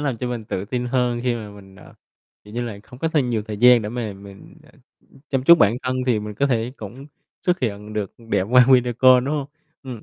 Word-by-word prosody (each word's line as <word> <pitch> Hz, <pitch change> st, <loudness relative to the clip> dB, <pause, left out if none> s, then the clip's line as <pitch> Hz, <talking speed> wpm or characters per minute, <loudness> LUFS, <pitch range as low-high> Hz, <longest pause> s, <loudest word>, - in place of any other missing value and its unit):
làm 135 Hz, -5 st, -2 dB
cho 125 Hz, -, -3 dB
mình 120 Hz, -3 st, -5 dB
tự 95 Hz, -2 st, -4 dB
tin 125 Hz, +3 st, -3 dB
hơn 125 Hz, -1 st, 0 dB
khi 125 Hz, -1 st, +1 dB
mà 110 Hz, -3 st, -7 dB
mình, 95 Hz, -2 st, -15 dB
à, -, -, -16 dB, 0.5 s
kiểu 105 Hz, -, -13 dB
như 120 Hz, -, -2 dB
là, 115 Hz, -4 st, -6 dB
không 125 Hz, -, -15 dB
có 165 Hz, -, -1 dB
thêm 145 Hz, -6 st, 0 dB
nhiều 110 Hz, -3 st, -1 dB
thời 105 Hz, -2 st, -5 dB
gian 125 Hz, +1 st, +6 dB
để 105 Hz, -, -4 dB
mà 115 Hz, -2 st, -4 dB
mình, 100 Hz, 0 st, -14 dB
à, -, -, -21 dB, 0.6 s
chăm 135 Hz, -2 st, -1 dB
chút 170 Hz, -, +9 dB
bản 105 Hz, -1 st, +3 dB
thân 130 Hz, 0 st, -2 dB
thì 120 Hz, -4 st, +2 dB
mình 105 Hz, 0 st, -7 dB
có 140 Hz, +7 st, +1 dB
thể 120 Hz, -2 st, -1 dB
cũng 120 Hz, +7 st, -10 dB, 0.4 s
xuất 180 Hz, 0 st, +1 dB
hiện 105 Hz, -3 st, -4 dB
được 105 Hz, -2 st, -4 dB
đẹp 115 Hz, -5 st, -1 dB
qua 125 Hz, -1 st, +6 dB
video 125 Hz, -1 st, +4 dB
call 125 Hz, +1 st, +5 dB
đúng 145 Hz, -, -1 dB
hông? 145 Hz, -2 st, -3 dB, 0.4 s
Ừm. 125 Hz, -5 st, -8 dB
120 Hz, 250 wpm, -21 LUFS, 105-125 Hz, 0.6 s, chút